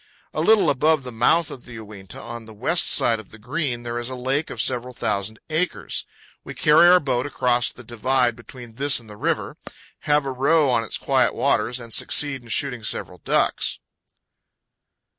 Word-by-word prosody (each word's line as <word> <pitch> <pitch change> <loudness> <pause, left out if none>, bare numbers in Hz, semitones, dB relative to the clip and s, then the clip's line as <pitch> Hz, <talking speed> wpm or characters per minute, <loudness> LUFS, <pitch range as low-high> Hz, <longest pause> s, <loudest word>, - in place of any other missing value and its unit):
A - - -1
little 220 -1 +4
above 150 +2 +2
the 125 - -6
mouth 145 +8 +2
of 125 - -10
the 120 - -12
Uinta, 105 -4 -10
on 120 -1 -8
the 110 - -12
west 160 +11 +1
side 115 -2 +4
of 110 - -13
the 110 - -14
Green, 125 +1 -3
there 120 0 -4
is 120 +1 -4
a 130 - -5
lake 135 +5 -1
of - - -8
several 125 0 -1
thousand 100 +1 -2
acres. 165 +4 -2 0.4
We - - -9
carry 155 +3 +5
our 180 +1 +7
boat 130 -3 -1
across 125 -4 +1
the 125 - -13
divide 120 +1 0
between 120 0 -12
this 140 +3 +2
and 115 - -15
the 105 - -11
river, - - -2 0.5
have 150 -1 +3
a 135 - -2
row 140 +2 +2
on 115 -2 +1
its 110 - -2
quiet - - +1
waters, 125 - 0
and 115 -2 -8
succeed 140 -3 +2
in 120 - -16
shooting 125 0 -1
several 90 -4 -2
ducks. - - 0
125 Hz, 190 wpm, -22 LUFS, 115-145 Hz, 0.5 s, our